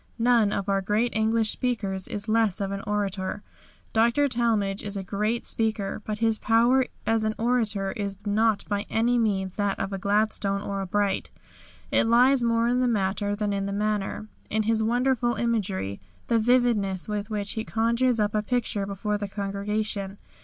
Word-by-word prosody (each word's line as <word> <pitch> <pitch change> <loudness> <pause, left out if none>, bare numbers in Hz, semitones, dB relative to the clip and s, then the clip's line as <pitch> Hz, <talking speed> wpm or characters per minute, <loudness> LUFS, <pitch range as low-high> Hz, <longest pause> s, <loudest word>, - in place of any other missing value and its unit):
None 230 -3 +3
of 200 -1 -2
our 195 -1 +1
great 210 +4 0
English 220 0 +2
speakers 200 -7 -2
is 205 +1 -4
less 220 -3 +2
of 195 -1 -2
an 200 0 -3
orator. 205 -1 -2 0.5
Dr. 235 +6 +3
Talmage 225 -6 0
is 205 -1 -3
a 195 - -4
great 210 +4 -1
speaker, 220 -2 -1
but 215 -1 -3
his 225 0 +1
power 240 +3 +3 0.2
as 225 0 +2
an 215 0 -1
orator 220 -5 0
is 200 -4 -4
not 215 0 +2
by 205 0 -2
any 240 +2 +2
means 190 -4 0
that 205 -1 0
of 195 - -3
a 195 - -3
Gladstone 200 0 0
or 200 -1 -3
a 195 - -4
Bright. 200 0 0 0.6
It - - +3
lies 250 +3 +5
more 230 0 +2
in 245 +1 +2
the 255 - +2
matter 205 -2 0
than 205 -1 -1
in 195 0 -2
the - - -3
manner, 210 0 -2 0.2
in 220 +1 0
his 220 +1 +2
wonderful 240 +1 +1
imagery, 200 - -1 0.3
the 230 - +2
vividness 220 -6 +2
with 210 0 -3
which 210 -1 -2
he 220 - -2
conjures 235 +2 +1
up 210 0 +1
a 215 - +1
picture 215 -3 -1
before 205 +1 -2
the 205 - -3
congregation. 200 0 -3
215 Hz, 180 wpm, -26 LUFS, 200-230 Hz, 0.6 s, lies